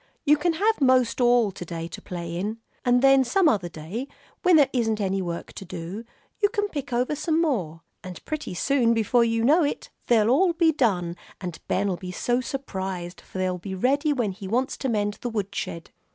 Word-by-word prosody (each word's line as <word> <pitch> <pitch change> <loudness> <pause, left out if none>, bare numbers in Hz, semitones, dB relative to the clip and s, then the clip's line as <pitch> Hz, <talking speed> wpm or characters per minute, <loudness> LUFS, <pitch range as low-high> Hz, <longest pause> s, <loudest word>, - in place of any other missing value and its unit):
"You 295 0 +6
can 330 +3 0
have 420 +3 +1
most 255 -2 +3
all 240 -3 +4
to 180 - -8
day 165 -1 -5
to - - -9
play 170 -2 -6
in. 205 +5 -3 0.3
And 245 +1 +3
then 270 0 +6
some 370 +8 +3
other 190 - +1
day, 170 - -6 0.3
when 360 -2 +5
there 290 -3 +6
isn't 225 -4 0
any 195 -1 0
other 185 - -3
work 170 -1 -5
to - - -8
do, 180 +5 -7 0.3
you 410 -1 +3
can 415 -2 -1
pick 280 -4 -5
over 250 +5 0
some 315 +2 0
more; 190 - -1 0.2
and 185 -1 -9
pretty 305 -11 -4
soon, 235 +2 +2
before 230 +2 +3
you 230 0 +1
know 315 +6 +5
it, 290 - -3 0.2
they'll 225 -2 +4
all 345 +6 +4
be 335 -1 +3
done, 185 - 0 0.2
and 180 -4 -6
Ben'll 195 -1 0
be 180 0 -7
so 240 +7 0
surprised, 190 -10 -5
for - - -11
they'll 185 -1 -1
be 190 +2 -6
ready 280 - +2
when 240 -8 0
he 195 +1 -8
wants 250 +6 0
to 265 - -2
mend 205 -2 -1
the 245 - -2
woodshed." 200 -6 -4
230 Hz, 210 wpm, -25 LUFS, 185-275 Hz, 0.3 s, You